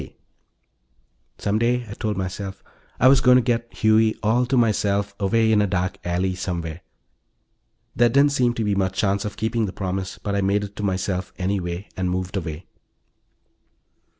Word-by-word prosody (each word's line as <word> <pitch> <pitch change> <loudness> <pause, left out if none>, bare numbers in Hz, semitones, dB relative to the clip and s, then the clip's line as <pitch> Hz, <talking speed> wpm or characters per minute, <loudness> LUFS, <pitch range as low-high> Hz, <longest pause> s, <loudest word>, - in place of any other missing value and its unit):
K." - - -12 1.2
Some 105 +1 0
day, 120 +1 +1
I 105 - -7
told 105 -2 -3
myself, 95 +1 -5 0.4
I 125 - +6
was 135 0 +6
going 125 -1 +6
to 125 - +4
get 115 -1 -1
Huey 110 0 +3
all 120 +4 +2
to 130 - +1
myself, 100 -3 +1
away 110 +2 +2
in 105 -1 +4
a 105 - +2
dark 90 -1 -2
alley 90 +2 0
somewhere. 85 -3 -4 1.1
There 120 +1 +4
didn't 140 +4 +4
seem 125 -3 +1
to 115 - -1
be 105 -1 +1
much 95 -1 -1
chance 100 0 +1
of 105 - -5
keeping 110 0 0
the 95 - -6
promise, 95 -1 -4
but 100 - -4
I 100 - +1
made 100 +1 +1
it 100 0 -8
to - - -4
myself 95 -1 -2
anyway, 90 0 -2
and 90 -1 -1
moved 90 +2 -3
away. 85 -2 -4
100 Hz, 180 wpm, -23 LUFS, 95-115 Hz, 1.2 s, I